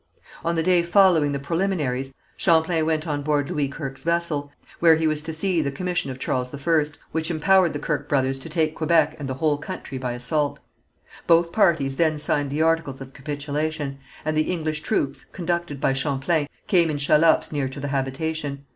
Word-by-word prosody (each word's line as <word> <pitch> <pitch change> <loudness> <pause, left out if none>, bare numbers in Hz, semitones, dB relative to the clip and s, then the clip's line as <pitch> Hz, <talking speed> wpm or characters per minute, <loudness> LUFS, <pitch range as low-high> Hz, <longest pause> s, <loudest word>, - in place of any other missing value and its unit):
On 170 0 0
the 165 - +1
day 180 -1 +4
following 170 -4 +4
the 140 - -1
preliminaries, 140 -4 -1 0.2
Champlain 160 -2 +2
went 160 0 0
on 145 -3 -2
board 145 -1 0
Louis 145 -2 0
Kirke's 135 -2 -6
vessel, 165 -4 -1 0.3
where 165 -1 +6
he 160 0 0
was 155 -1 +1
to 160 +1 -5
see 170 +1 0
the 140 - -1
commission 180 +2 -2
of 130 - -5
Charles 125 -1 -2
I, 155 +2 +2 0.3
which 160 +1 -1
empowered 175 +2 +3
the - - -2
Kirke 145 -2 -3
brothers 135 -1 +1
to 150 - -9
take 160 -1 0
Quebec 155 -1 +2
and 140 -2 -5
the 130 - -2
whole 145 +1 +1
country 135 -2 -6
by 125 -1 -3
assault. 140 +4 -1 0.7
Both 170 0 +4
parties 160 -9 +2
then 160 -2 +2
signed 145 -1 +1
the 150 +3 0
articles 165 -4 0
of 135 0 -10
capitulation, 145 0 -3 0.3
and 155 - 0
the 155 +3 +1
English 155 -3 -2
troops, 140 -2 -1
conducted 170 -4 -3
by 135 - +2
Champlain, 140 +3 0 0.2
came 170 -4 +3
in 150 - -1
shallops 150 +3 +3
near 140 -3 -1
to 135 - -8
the 140 +1 -4
habitation. 140 +1 -3
155 Hz, 190 wpm, -24 LUFS, 140-165 Hz, 0.7 s, where